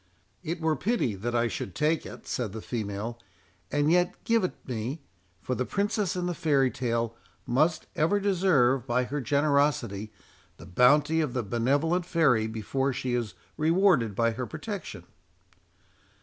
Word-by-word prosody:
"It 165 +2 -4
were 160 -1 +1
pity 190 - 0
that 115 +5 -3
I 120 0 +2
should 95 -3 -5
take 155 +1 +1
it," - - -11
said 115 -6 -3
the 110 - -6
female; 110 0 -4 0.5
"and 145 +1 +2
yet 180 0 +3
give 230 -2 +2
it 185 - -1
me—for 110 - -6
the 125 - -1
princess 200 - -1
in 180 -1 -2
the 175 - -1
fairy 145 -6 +2
tale 115 -2 -2 0.3
must 155 +6 +1
ever 165 +7 +2
deserve, 165 - +2
by 125 +1 +2
her 140 +4 -3
generosity, 140 -6 +1 0.5
the - - -12
bounty 145 - +4
of 145 -6 -2
the 125 - -1
benevolent 145 - +1
fairy, 135 -11 +3
before 115 +5 -1
she 125 0 -3
is 115 -6 -2 0.2
rewarded 160 - +3
by 115 +2 +2
her 120 +2 -4
protection." 155 - -6
135 Hz, 150 wpm, -28 LUFS, 115-160 Hz, 0.5 s, bounty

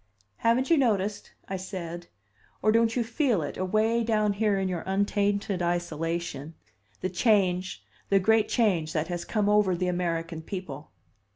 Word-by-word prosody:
"Haven't 245 +6 +1
you 330 - +6
noticed," 210 -5 0 0.2
I 190 - -3
said, 175 -2 -6 0.6
"or 215 - +4
don't 230 0 +3
you 245 - +1
feel 230 - 0
it, 145 - -5
away 215 +5 +1
down 215 -2 +1
here 205 -1 +1
in 190 0 0
your 180 -3 -2
untainted 200 0 0
isolation, 170 -3 -2 0.5
the 185 - -1
change, 185 -3 +1 0.3
the 195 - +4
great 220 +3 +3
change, 180 -10 +1
that 155 +1 -1
has 175 -1 -3
come 210 -2 0
over 205 -3 +3
the 180 +1 -1
American 165 -2 -2
people?" 160 -5 -7
190 Hz, 155 wpm, -27 LUFS, 175-215 Hz, 0.6 s, you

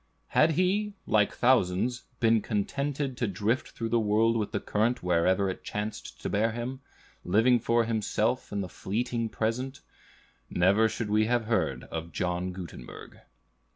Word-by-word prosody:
Had 160 +1 +4
he, 200 +4 +1
like 105 -2 +3
thousands, 120 -1 +2
been 115 -1 +4
contented 140 +6 -2
to 120 - 0
drift 105 +6 0
through 115 -1 -4
the 120 +1 +3
world 110 +2 +3
with 110 -3 -1
the - - -1
current 110 +2 0
wherever 90 +2 +2
it 95 - -4
chanced 105 +1 -5
to - - -1
bear 110 +3 +1
him, 120 +3 -4 0.4
living 115 +6 +4
for 115 +1 +2
himself 115 +2 -1
and 100 -1 -1
the - - -5
fleeting 115 +5 -2
present, 125 +6 -2 0.7
never 100 +5 +3
should 110 -1 -4
we 110 +1 +4
have 120 -1 +1
heard 80 - 0
of 85 +1 -5
John 90 +2 -2
Gutenberg. 90 -9 -9
110 Hz, 155 wpm, -28 LUFS, 100-120 Hz, 0.7 s, Had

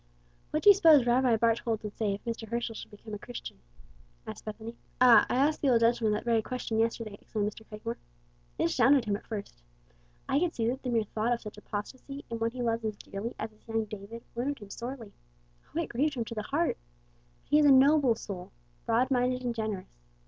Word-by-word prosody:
"What 305 - -1
do 410 - +10
you - - +8
suppose 320 -9 +6
Rabbi 245 -1 +3
Barthold 230 0 +1
would 210 -1 -6
say 205 -3 0
if 200 - -13
Mr. 230 -1 -4
Herschel 235 0 -2
should - - -9
become 210 +1 -11
a 210 - -4
Christian?" 240 - -8 0.7
asked - - -8
Bethany. 220 +2 -7 0.2
"Ah, 250 -2 +7
I - - 0
asked 290 +4 +2
the 280 - +3
old 235 -2 +4
gentleman 230 -1 +3
that 210 - -3
very 230 -2 +3
question 230 -1 -3
yesterday," 225 -2 -1
exclaimed 210 -1 -2
Mr. 220 - -13
Cragmore. 220 +2 -5 0.6
"It - - 0
astounded 260 +9 +4
him 205 -1 0
at 205 - -9
first. 205 - -6 0.7
I 275 - +2
could 345 0 0
see 225 - 0
that 260 +3 -3
the 255 - -3
mere 230 -2 +2
thought 220 +3 -1
of 235 - -3
such 210 -1 -9
apostasy 260 +7 -7
in 230 - -3
one 225 0 +1
he 245 +1 -5
loves 230 -1 0
as 215 -1 -2
dearly 200 +5 -6
as 220 - -4
his 215 - -27
young 225 -1 0
David, 215 +2 -9
wounded 270 +4 -2
him 200 - -12
sorely. 240 -2 -6 0.6
O, - - +1
it 335 - -2
grieved 285 +5 0
him 235 -2 -2
to 230 - -6
the 215 - -3
heart! 295 +9 0 0.7
But - - -33
he 300 - +6
is 295 - +5
a - - +8
noble 270 -2 +6
soul, 185 -5 -7 0.4
broad 245 +4 +2
minded 250 0 +1
and 245 -1 -1
generous. 215 - -5
230 Hz, 220 wpm, -29 LUFS, 215-255 Hz, 0.7 s, do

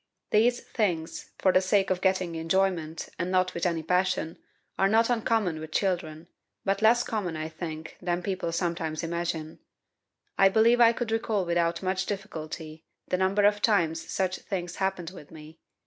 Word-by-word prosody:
These 240 +3 +3
things, 175 -7 -2
for 190 - +3
the 185 - +5
sake 195 +1 +2
of 185 -1 0
getting 185 -2 +1
enjoyment, 165 -1 0
and 180 - -1
not 185 0 +1
with 170 +1 0
any 165 -2 -1
passion, 180 -1 0 0.4
are 195 - +2
not 225 +3 +3
uncommon 220 -8 +1
with 155 0 -8
children, 170 -4 -1 0.4
but 195 +1 0
less 235 +2 +5
common, 185 -7 -3
I 155 0 -3
think, 160 -1 -7
than 175 0 -1
people 185 -3 -2
sometimes 165 -2 -2
imagine. 165 -2 -3 0.8
I 195 - +7
believe 230 +4 +4
I 230 -1 +8
could 235 -1 -3
recall 220 -3 0
without 170 0 0
much 190 0 -1
difficulty, 160 -5 -6 0.3
the 185 - +1
number 190 +2 +2
of 205 0 +3
times 165 -8 +1
such 185 -1 0
things 175 -3 -5
happened 190 -3 -2
with 165 -6 -12
me. 155 0 -13
185 Hz, 165 wpm, -27 LUFS, 165-200 Hz, 0.8 s, I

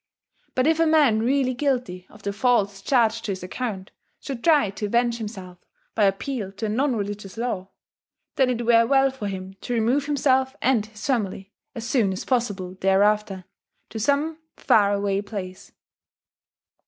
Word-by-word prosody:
But 255 - +2
if 320 +1 +2
a 330 - +4
man 295 -9 +4
really 255 +2 +1
guilty 245 -10 -2
of 210 -1 -17
the 200 - -2
faults 205 -3 +1
charged 230 -1 +2
to 200 - -1
his 185 - -8
account 190 -1 -5 0.3
should 265 -5 -7
try 295 - +4
to 205 +1 -4
avenge 235 +2 +1
himself 190 -5 -8 0.3
by 215 - +3
appeal 200 +1 -2
to 200 +3 -5
a - - -1
non 255 +4 +1
religious 205 -1 -5
law, 210 -6 -3 0.7
then 265 -2 +3
it 240 -1 -2
were 230 0 +5
well 270 0 +4
for 255 -6 -6
him 190 -1 -6
to 245 - -3
remove 245 +6 +1
himself 265 -2 +1
and 240 -5 +1
his 215 -1 -10
family, 205 -6 -2 0.2
as 230 -1 -5
soon 230 -6 +2
as 185 - -6
possible 205 -8 -1
thereafter, 195 0 +2 0.5
to 220 - -5
some 290 +7 0 0.2
far 205 -2 +3
away 200 -1 0
place. 195 -3 -7
225 Hz, 165 wpm, -24 LUFS, 200-255 Hz, 0.7 s, were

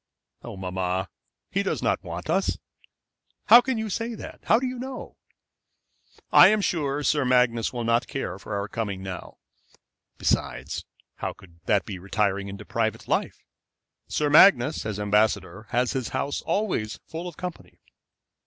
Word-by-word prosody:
"Oh, - - -8
mamma, 95 0 -2 0.4
he - - +1
does - - -2
not - - +1
want - - -6
us." - - +1 0.9
"How 235 +3 +11
can 260 -1 -2
you 220 0 -2
say 230 +3 -3
that? - - -9
How 220 - +5
do 260 - -2
you 255 -1 -4
know?" 260 +1 -7 1.2
"I - - +9
am 215 - +3
sure 150 -7 -1
Sir 145 +1 +2
Magnus 125 -2 +2
will 120 -2 -4
not 115 +1 +2
care 100 -8 -4
for 100 - -5
our 100 0 -2
coming 100 -4 -4
now. 95 -2 -7 0.8
Besides, - - -1 0.3
how - - -3
could 85 -3 -19
that 105 -2 +2
be 95 -4 -6
retiring 100 +1 0
into 100 +1 -8
private 110 -2 -2
life? - - -1 0.6
Sir 150 - 0
Magnus, 150 - +6
as 105 -1 -4
ambassador, 105 -1 +1
has 125 +1 +1
his 130 -4 -2
house 140 - -2
always 180 - -1
full 165 +2 -6
of 175 - -9
company." 180 -2 -8
115 Hz, 155 wpm, -25 LUFS, 100-165 Hz, 1.2 s, How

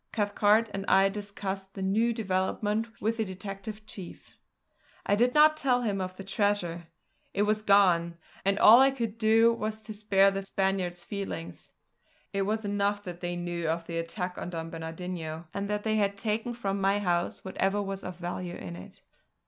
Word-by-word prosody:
Cathcart 210 +1 +3
and 195 - -3
I 195 +1 +5
discussed 195 -1 -5
the 195 - -4
new 220 +5 +2
development 210 +1 -1
with 225 +2 0
the 220 - +1
detective 195 +2 -7
chief. 190 -5 -10 0.7
I - - +2
did 245 +5 +3
not 305 +1 +7
tell 255 -5 +1
him 200 -4 -1
of 185 0 -4
the 195 - -7
treasure. 190 -4 -1 0.5
It 200 - +3
was 215 +1 +1
gone; 180 -5 +4 0.3
and 195 +1 +2
all 225 +4 +9
I 270 +1 +7
could 230 -5 -4
do 225 +1 +5
was 220 -1 -4
to 215 - -7
spare 195 -2 +3
the 195 0 -3
Spaniard's 190 -3 -1
feelings. 90 - -6 0.6
It 195 0 0
was 215 0 -1
enough 205 0 0
that 175 -2 -8
they 175 0 -2
knew 175 -1 -3
of 165 +1 -1
the 165 0 -3
attack 180 +2 -4
on - - -5
Don 165 -1 -5
Bernardino, 165 0 -5
and 200 0 -3
that 210 0 -1
they 220 -1 +1
had 200 -1 +1
taken 220 +3 -2
from 200 -4 -2
my 195 +1 +3
house 175 -3 -1
whatever 195 +1 0
was 195 -1 -4
of 180 -1 -6
value 175 0 -5
in 90 -3 -7
it. 90 - -13
195 Hz, 180 wpm, -29 LUFS, 180-215 Hz, 0.7 s, all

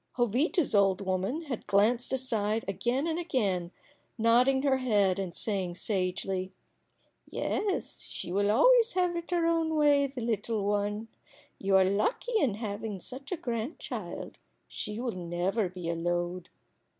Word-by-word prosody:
Jovita's 260 - +1
old 195 -2 +3
woman 195 - -1
had 265 -7 -5
glanced 225 +5 +2
aside 225 -4 0
again 240 - 0
and 330 0 -1
again, 200 - 0 0.5
nodding 245 +4 +4
her 270 -2 +3
head, 205 -7 +2
and 185 -3 -4
saying, 190 -5 -1
sagely: 185 -1 -2 0.8
"Yes, 405 -2 -2
she 175 - -6
will 200 +2 +2
always 475 - +5
have 360 -1 +1
it 340 0 -5
her 345 -1 +1
own 330 -1 +1
way 290 -2 +4
the 265 -2 -7
little 220 -2 -1
one. 205 +2 -1 0.5
You 195 0 +2
are 190 - +5
lucky 210 - 0
in 245 - +1
having 210 -2 -4
such 265 - -7
a 365 - -1
grandchild. 235 +1 -5 0.3
She 210 +1 -5
will 245 -1 -1
never 180 +3 -1
be 180 -1 -7
a 170 - 0
load." 175 +1 -2
220 Hz, 145 wpm, -29 LUFS, 195-270 Hz, 0.8 s, always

